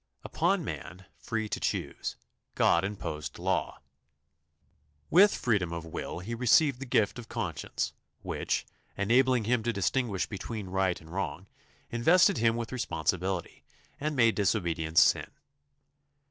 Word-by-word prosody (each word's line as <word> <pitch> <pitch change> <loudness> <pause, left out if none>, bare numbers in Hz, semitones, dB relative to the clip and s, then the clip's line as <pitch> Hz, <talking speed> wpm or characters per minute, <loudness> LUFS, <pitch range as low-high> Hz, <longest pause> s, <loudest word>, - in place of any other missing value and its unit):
Upon - - +1
man, 90 +1 -7
free 110 -1 -3
to - - -3
choose, - - -3 0.4
God 85 - +4
imposed 80 -7 -5
law. - - -1 1.3
With 200 +5 +6
freedom 100 -8 0
of 85 -1 -5
will 85 +1 -5
he 110 +6 -5
received 125 +3 +3
the 135 - -6
gift 110 -1 +1
of 115 - -10
conscience, 80 -6 -3 0.3
which, - - -2 0.3
enabling 125 +4 +3
him 120 +2 +1
to 120 +2 0
distinguish 100 +1 0
between 105 -1 -6
right 95 -1 0
and 80 0 -15
wrong, 95 0 -3 0.5
invested 170 - +4
him 115 0 +3
with 115 -1 -4
responsibility, 95 -6 -2 0.4
and 150 +1 -2
made 115 -4 +4
disobedience 85 -6 +2
sin. - - +3
105 Hz, 130 wpm, -29 LUFS, 90-120 Hz, 1.3 s, With